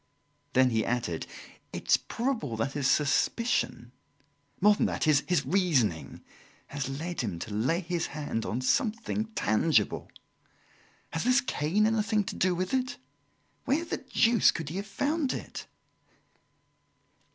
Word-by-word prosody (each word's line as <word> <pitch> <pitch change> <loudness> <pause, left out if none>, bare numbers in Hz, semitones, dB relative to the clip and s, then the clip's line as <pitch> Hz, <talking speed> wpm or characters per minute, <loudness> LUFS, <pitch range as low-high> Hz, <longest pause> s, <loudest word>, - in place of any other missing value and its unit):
Then 130 -1 +4
he 110 -1 +1
added: 115 -10 -2 0.4
"It - - -7
is - - +7
probable 235 - -3
that 110 +5 -1
his 140 -1 0
suspicion 150 - +1 0.7
more 210 +2 +6
than 205 - +1
that, - - -2
his 155 +1 +2
reasoning 135 - 0 0.5
has 140 -2 -3
led 160 +5 -3
him 100 -8 -3
to 100 +5 -6
lay 130 - +1
his 170 -1 -2
hand 145 -7 -3
on 120 +4 -2
something 220 - 0
tangible. 110 +1 +1 1.0
Has 160 - -1
this 250 +2 +4
cane 190 0 +1
anything 215 -1 +1
to - - -6
do 185 -1 +1
with 185 +4 -2
it? 255 -1 0 0.7
Where 310 +6 +1
the - - -3
deuce 230 -3 +3
could 160 -3 -2
he 170 - -5
have 200 +1 -4
found 280 +6 0
it?" - - -7
165 Hz, 140 wpm, -29 LUFS, 130-215 Hz, 1.0 s, is